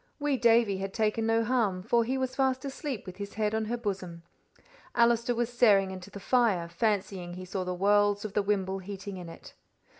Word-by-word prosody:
Wee 290 -2 0
Davie 230 -5 +3
had 195 0 -5
taken 220 0 +1
no 225 0 +3
harm, 220 -6 0
for 235 +4 +2
he 255 +4 -1
was 260 -1 -2
fast 265 0 +1
asleep 275 -3 -5
with 185 0 -9
his 200 0 -7
head 215 -1 0
on 220 0 0
her 240 +3 -2
bosom. 190 -7 -5 0.7
Allister 235 0 +3
was 240 +1 -1
staring 200 -5 +4
into 185 +1 -8
the 200 - -9
fire, 205 -6 +2
fancying 185 -1 -2
he 185 0 -7
saw 185 +1 -3
the 180 0 -4
whorls 205 +1 +3
of 205 - -5
the 210 - +2
wimble 195 -1 -1
heating 195 0 -7
in 175 -2 -8
it. 165 - -12
205 Hz, 205 wpm, -29 LUFS, 190-235 Hz, 0.7 s, staring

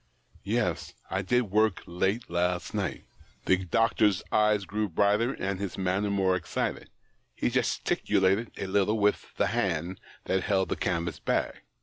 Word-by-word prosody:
■Yes; - - -1 0.2
I 95 - 0
did 110 +2 +1
work 110 -1 +2
late 95 +6 -1
last 90 +1 -1
night." 100 -9 -2 0.4
The 95 - +4
doctor's 105 +1 +2
eyes 105 -2 +3
grew 105 +2 -2
brighter, 105 +8 +2
and 95 -4 -3
his 100 -2 -4
manner 95 +2 0
more 95 -2 +2
excited; 85 -3 -3 0.5
he - - 0
gesticulated 95 +4 +1
a - - -3
little 100 +3 +1
with 105 -1 +1
the - - +3
hand 90 -6 -1 0.3
that 95 0 +1
held 95 0 +1
the - - 0
canvas 85 -2 -2
bag. - - -1
95 Hz, 145 wpm, -28 LUFS, 90-105 Hz, 0.5 s, The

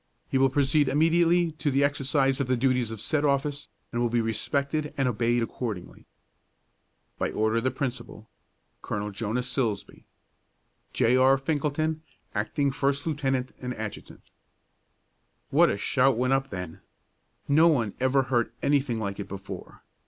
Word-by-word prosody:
He 135 - +1
will 135 0 +5
proceed 140 +2 +2
immediately 165 +4 +3
to 145 - 0
the 140 +1 +2
exercise 140 -1 +1
of 140 - -1
the 130 0 +1
duties 125 -2 +1
of 110 -1 -6
said 150 +7 0
office, 145 0 0 0.2
and 120 - -1
will 120 - +2
be 120 +1 +1
respected 140 +7 -1
and 135 -2 +1
obeyed 120 0 +1
accordingly. 110 -6 -6 1.1
By - - 0
order 110 +1 0
of 115 - 0
the - - +4
Principal, 125 -5 -5 0.5
Col. 105 0 -3
JONAS 110 +4 -2
SILSBEE. 120 -6 -3 0.9
J. 120 +2 +3
R. 130 +1 +5
FINKELTON, 155 +2 -1 0.3
Acting 135 +7 0
First 140 +1 -1
Lieut. 150 -3 -3
and 130 -1 0 0.2
Adjt. 110 -1 -7 1.3
What - - +5
a - - -1
shout 130 +4 +2
went 130 +2 +2
up 135 0 0
then! 90 -4 -7 0.7
No 155 +4 +5
one 120 - +2
ever 130 +1 +3
heard 120 -3 0
anything 140 -4 +1
like 100 -2 -4
it 100 - -5
before. 100 0 -9
130 Hz, 150 wpm, -27 LUFS, 115-140 Hz, 1.3 s, will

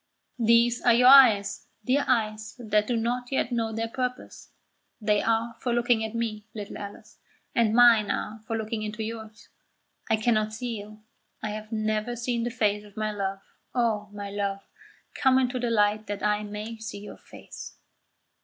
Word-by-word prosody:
These 235 +1 +4
are 240 -2 +5
your 250 +1 +6
eyes, 220 -7 +6 0.2
dear 275 +3 +2
eyes 215 -3 0
that 215 -3 +1
do 240 - 0
not 245 +2 -2
yet 265 -2 0
know 230 -2 -1
their 225 +1 -2
purpose; 250 +1 -5 0.5
they 210 -1 +2
are 230 +1 0
for 245 - -2
looking 240 -2 +2
at 220 +1 -5
me, 220 -2 -3
little 205 -2 -7
Alice, 205 -1 -10 0.3
and 225 -2 +2
mine 230 -4 +6
are 215 +2 -3
for 225 - -1
looking 220 0 -3
into 215 +1 -4
yours. 220 0 -8 0.6
I 220 - +4
cannot 215 -1 +1
see 230 -1 -4
you; 215 +1 -12 0.4
I 215 - -2
have 215 +1 -7
never 215 +1 -1
seen 235 0 -2
the - - -1
face 210 -3 0
of 205 -1 -17
my 215 0 -1
love 195 -1 -3 0.3
oh, 220 -4 0
my 205 -1 -7
love, 200 -1 -2 0.5
come 260 -1 +3
into 255 -1 +1
the 240 -1 -1
light 210 -1 +2
that 205 0 -5
I 210 0 +2
may 210 +2 -6
see 220 -2 -6
your 210 - -10
face." - - -11
220 Hz, 175 wpm, -26 LUFS, 210-235 Hz, 0.6 s, your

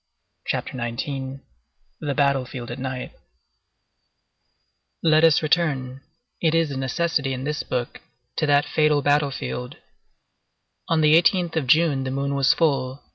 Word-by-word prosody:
CHAPTER - - -3
XIX—THE 130 - -6
BATTLE 140 -3 +2
FIELD 125 -2 -8
AT 120 - -6
NIGHT 130 -1 -5 1.9
Let 155 -1 +4
us 165 -1 +5
return—it 155 - -2
is 165 -3 +1
a - - -4
necessity 135 +1 -1
in 130 0 -5
this 150 +2 -2
book—to 120 +3 -5
that 145 0 +3
fatal 150 -2 +2
battle 145 0 +2
field. 125 -1 -6 1.1
On 165 -1 +2
the 155 +2 +6
18th 175 -1 +1
of 155 -5 -1
June 150 -1 +3
the 130 - -3
moon 140 +1 -2
was 140 -1 +3
full. 140 -4 0
140 Hz, 130 wpm, -23 LUFS, 130-155 Hz, 1.9 s, the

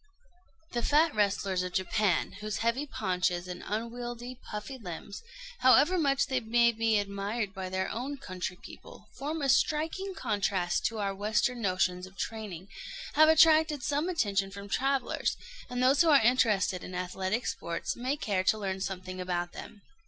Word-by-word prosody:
The 240 - -1
fat 300 +5 +3
wrestlers 200 -3 +1
of 180 0 -4
Japan, 190 -1 +1
whose 215 -1 -3
heavy 255 +6 +1
paunches 180 -6 -1
and 180 0 -6
unwieldy, 240 +3 -5
puffy 220 +5 -6
limbs, 185 0 -7 0.4
however 285 +8 +5
much 275 -3 +2
they 265 -2 0
may 235 +1 +3
be 225 -1 +1
admired 200 +1 -2
by 190 -2 -5
their 190 0 -1
own 265 +6 -4
country 185 -5 -5
people, - - -13
form 300 +2 -3
a - - +1
striking 320 +8 +1
contrast 195 - 0
to 225 - -5
our 200 -2 -1
Western 215 +4 0
notions 185 -2 0
of 190 +1 -18
training, 205 -5 -5 0.5
have 310 +1 +6
attracted 315 -3 +5
some 295 +5 0
attention 200 - 0
from 200 +1 -9
travellers; 270 +5 0 0.3
and 250 0 -1
those 265 +2 +5
who 335 - +4
are 290 -3 +7
interested 210 -7 +2
in 180 - -7
athletic 185 +5 -2
sports 170 0 -3
may 260 +4 -2
care 200 -9 -1
to 215 - +3
learn 190 -2 -3
something 185 -1 -4
about 175 -1 -2
them. 205 - -10
215 Hz, 160 wpm, -30 LUFS, 190-265 Hz, 0.5 s, are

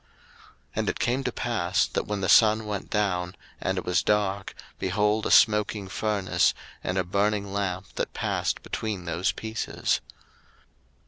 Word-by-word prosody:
01:015:017 - - -34 0.7
And - - +1
it - - -3
came 125 +3 0
to 125 - 0
pass, 100 -7 0
that, - - -3
when 105 -1 -2
the 95 - 0
sun 110 +2 +6
went 105 -2 -4
down, 90 -4 0 0.2
and 95 - -1
it 95 - -3
was 90 -1 +2
dark, 100 -1 0 0.2
behold 105 +3 +1
a - - -2
smoking 105 -2 +4
furnace, 100 -1 +1 0.3
and 90 - -1
a 95 - +2
burning 100 +2 0
lamp 95 -2 -2
that - - -1
passed - - -1
between 105 -5 -4
those 85 +3 0
pieces. 110 -1 -2
100 Hz, 155 wpm, -26 LUFS, 95-105 Hz, 0.7 s, sun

